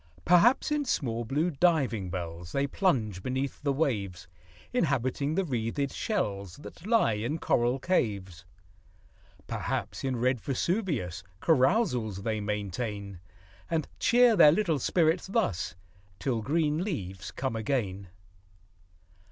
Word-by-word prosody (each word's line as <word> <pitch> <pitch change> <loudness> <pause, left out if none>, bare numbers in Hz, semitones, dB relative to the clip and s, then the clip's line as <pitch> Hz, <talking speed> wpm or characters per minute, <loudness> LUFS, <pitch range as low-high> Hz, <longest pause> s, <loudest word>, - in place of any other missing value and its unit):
Perhaps, 180 - +5
in 300 -1 +1
small, 120 - -1
blue 150 +9 0
diving 135 - +1
bells 85 -1 -6
They 140 0 +1
plunge 120 - 0
beneath 130 +4 -3
the 145 - +1
waves, 105 - -1 0.5
Inhabiting 140 - 0
the 195 - +2
wreathed 130 +1 -2
shells 100 - -2
That 160 +5 -11
lie 225 - +3
in 115 +9 -2
coral 120 -4 +1
caves. 100 - -1 1.0
Perhaps, - - -3
in 130 -1 0
red 125 0 +1
Vesuvius 140 - -1 0.2
Carousals 125 - +2
they 110 -1 -1
maintain; 100 -1 -4 0.5
And 160 -2 0
cheer 245 -1 +5
their 160 -6 +8
little 165 -4 +1
spirits 165 +6 +2
thus, 190 - -1 0.4
Till 120 +1 -1
green 155 +5 +1
leaves 95 - -4
come 130 -3 -3
again. 105 -5 -2
130 Hz, 120 wpm, -29 LUFS, 105-165 Hz, 1.0 s, their